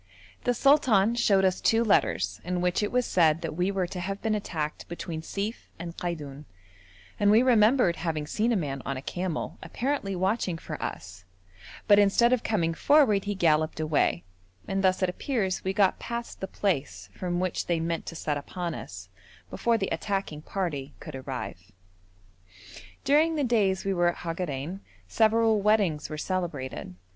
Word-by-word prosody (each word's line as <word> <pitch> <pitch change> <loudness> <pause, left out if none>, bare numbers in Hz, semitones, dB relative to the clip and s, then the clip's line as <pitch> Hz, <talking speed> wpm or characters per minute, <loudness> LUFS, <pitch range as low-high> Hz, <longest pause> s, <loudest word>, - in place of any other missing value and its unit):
The 245 - +2
sultan 240 -8 +4
showed 205 -5 +3
us 185 -1 +1
two 225 +1 +3
letters 95 - +1
in 180 +1 -2
which 180 +2 +1
it 210 - -1
was 250 -1 +1
said 165 -2 +3
that 160 -2 -4
we 180 +3 +1
were 195 -2 0
to 180 +1 -6
have 195 +3 -3
been 220 -1 0
attacked 160 -7 -3
between 170 -1 -5
Sief 205 +7 -5
and 170 0 -7
Kaidoun, 150 -5 -5 0.7
and 205 - +4
we 220 +4 +6
remembered 230 -6 +4
having 160 -3 -2
seen 220 +9 0
a - - +2
man 140 -7 -2
on 140 0 -3
a - - -5
camel 180 0 -4
apparently 245 -6 -2
watching 190 -1 0
for - - -7
us, 90 0 -6 0.6
but 205 -1 +7
instead 220 +5 +4
of 250 - +2
coming 170 -7 0
forward 240 - +4
he 205 0 -2
galloped 155 -3 +2
away; 155 - +1 0.4
and 195 0 -1
thus 185 0 +2
it 185 - +2
appears 190 -1 -2
we 190 - 0
got 195 -1 +2
past 235 0 -5
the 190 - -4
place 135 - -2
from 175 -1 -2
which 185 -1 -2
they 170 -2 +1
meant 165 0 -2
to 165 - -6
set 150 -2 -2
upon 175 +3 -5
us, 90 -8 -8 0.4
before 235 -1 +1
the 195 -3 -2
attacking 195 -7 -2
party 155 -7 -4
could 155 - -9
arrive. 125 -9 -6 1.3
During 315 +3 +3
the 295 - 0
days 205 -7 +1
we 195 - +1
were 175 -1 +2
at 175 - 0
Hagarein 165 0 -3 0.3
several 225 -1 +3
weddings 200 -7 +2
were 155 - -5
celebrated. 150 - -4
185 Hz, 170 wpm, -27 LUFS, 160-210 Hz, 1.3 s, but